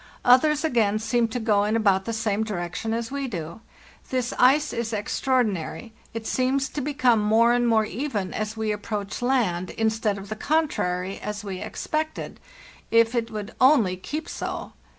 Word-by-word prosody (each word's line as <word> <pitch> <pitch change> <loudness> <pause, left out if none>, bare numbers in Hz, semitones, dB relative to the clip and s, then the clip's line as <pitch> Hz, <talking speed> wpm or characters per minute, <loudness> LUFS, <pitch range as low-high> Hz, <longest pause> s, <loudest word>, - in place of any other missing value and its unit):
Others, 295 +5 +5
again, 225 -9 +2
seem 225 +2 +1
to 225 +2 -4
go 210 -3 +2
in 210 +2 0
about 200 -4 +2
the 230 - -2
same 220 -1 0
direction 195 +1 -4
as 230 +1 -2
we 280 -1 -2
do. 170 -2 -6 0.5
'This 255 -1 -1
ice 285 +4 +4
is 230 -1 -3
extraor 250 +4 +1
dinary; 195 +2 -5 0.2
it 225 -1 -6
seems 265 +2 0
to 290 - -4
become 260 -5 +2
more 225 +3 +4
and 240 0 +2
more 220 -2 +3
even 215 -5 -3
as 215 +1 -3
we 220 -1 -1
approach 210 0 -4
land, 220 -9 +1
instead 220 -2 0
of 195 0 -9
the 215 - -3
contrary, 195 - -1
as 210 0 -5
we 190 -3 -5
expected. 310 0 -4 0.5
If 230 0 +4
it 230 -2 -1
would 210 0 -6
only 255 -9 +5
keep 300 - -5
so! - - -5
225 Hz, 170 wpm, -25 LUFS, 205-255 Hz, 0.5 s, Others